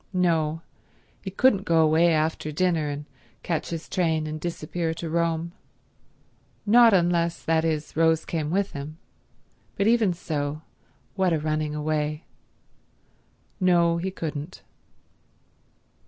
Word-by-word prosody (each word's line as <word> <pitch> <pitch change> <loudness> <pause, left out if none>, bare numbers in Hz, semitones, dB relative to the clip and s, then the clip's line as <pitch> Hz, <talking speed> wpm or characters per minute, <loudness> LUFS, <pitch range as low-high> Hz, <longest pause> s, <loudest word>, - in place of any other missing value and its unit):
No, 165 -3 +1 0.6
he 195 - -5
couldn't 200 +1 +3
go 165 -4 +2
away 160 +2 +4
after 155 -1 0
dinner 160 -1 0
and 145 0 -5 0.4
catch 165 -3 -2
his 165 -1 -5
train 160 -4 0
and 155 0 -5
disappear 165 0 -3
to 165 -1 -5
Rome; 170 0 0 1.1
not 230 +2 +7
unless, 170 -3 +1
that 160 0 +2
is, 155 -2 -2
Rose 160 0 +2
came 155 -3 -2
with 195 +4 0
him. 150 +1 -7 0.8
But 200 - 0
even 225 -4 +3
so, 155 -3 -4 0.5
what 190 -3 +1
a - - +2
running 155 0 -2
away. 150 0 -2 1.4
No, 170 -2 +3
he 180 +3 -2
couldn't. 160 -2 -6
165 Hz, 125 wpm, -25 LUFS, 155-175 Hz, 1.4 s, not